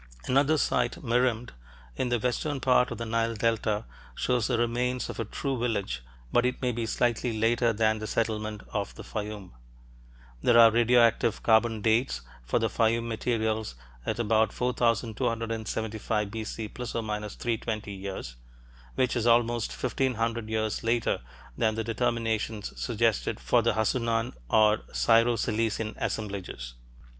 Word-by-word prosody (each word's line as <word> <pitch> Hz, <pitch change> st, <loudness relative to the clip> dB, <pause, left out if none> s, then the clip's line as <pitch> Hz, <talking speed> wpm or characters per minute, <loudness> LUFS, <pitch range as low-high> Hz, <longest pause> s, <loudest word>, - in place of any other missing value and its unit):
Another 140 Hz, +4 st, +3 dB
site, 125 Hz, -4 st, 0 dB
Merimde, 120 Hz, -1 st, +1 dB, 0.4 s
in 125 Hz, -, -1 dB
the 120 Hz, -, +2 dB
western 125 Hz, +4 st, -1 dB
part 125 Hz, -1 st, +3 dB
of -, -, -5 dB
the 115 Hz, -, -4 dB
Nile 115 Hz, 0 st, 0 dB
delta, 110 Hz, -1 st, 0 dB, 0.3 s
shows 125 Hz, -4 st, +1 dB
the 125 Hz, -, +1 dB
remains 120 Hz, +2 st, 0 dB
of -, -, -10 dB
a 115 Hz, -, -1 dB
true 135 Hz, +4 st, -3 dB
village, 100 Hz, -, -1 dB, 0.3 s
but 120 Hz, -, +4 dB
it 125 Hz, 0 st, 0 dB
may 125 Hz, -1 st, 0 dB
be 115 Hz, -1 st, -3 dB
slightly 120 Hz, 0 st, 0 dB
later 115 Hz, +2 st, +2 dB
than 110 Hz, 0 st, +1 dB
the 110 Hz, -, -5 dB
settlement 110 Hz, -2 st, -2 dB
of 100 Hz, -2 st, -2 dB
the -, -, -9 dB
Fayum. 105 Hz, -3 st, -6 dB, 0.9 s
There 120 Hz, -, +4 dB
are 115 Hz, -1 st, +9 dB
radioactive 115 Hz, -1 st, +3 dB
carbon 110 Hz, -1 st, +3 dB
"dates" 110 Hz, -, +1 dB, 0.2 s
for -, -, 0 dB
the 115 Hz, -, +2 dB
Fayum 115 Hz, +1 st, +1 dB
materials 110 Hz, -, -1 dB, 0.3 s
at -, -, -2 dB
about 110 Hz, -1 st, +2 dB
4275 115 Hz, -3 st, -1 dB
B.C. 110 Hz, 0 st, -5 dB
± 105 Hz, -4 st, -4 dB
320 110 Hz, -3 st, -3 dB
years, 95 Hz, -11 st, -6 dB, 0.6 s
which 130 Hz, -1 st, +1 dB
is 120 Hz, -1 st, 0 dB
almost 120 Hz, -1 st, +3 dB
fifteen 130 Hz, 0 st, -1 dB
hundred 115 Hz, 0 st, -2 dB
years 110 Hz, 0 st, -1 dB
later 115 Hz, -, +1 dB, 0.3 s
than 110 Hz, +5 st, +1 dB
the 110 Hz, -, -1 dB
determinations 115 Hz, -2 st, -1 dB
suggested 115 Hz, -2 st, 0 dB
for 120 Hz, -, +3 dB
the 115 Hz, 0 st, +2 dB
Hassunan 115 Hz, +1 st, 0 dB, 0.2 s
or 110 Hz, 0 st, +4 dB
Syro 115 Hz, +1 st, +4 dB
Cilician 110 Hz, 0 st, -1 dB
assemblages. 95 Hz, -, -4 dB
115 Hz, 140 wpm, -28 LUFS, 110-120 Hz, 0.9 s, are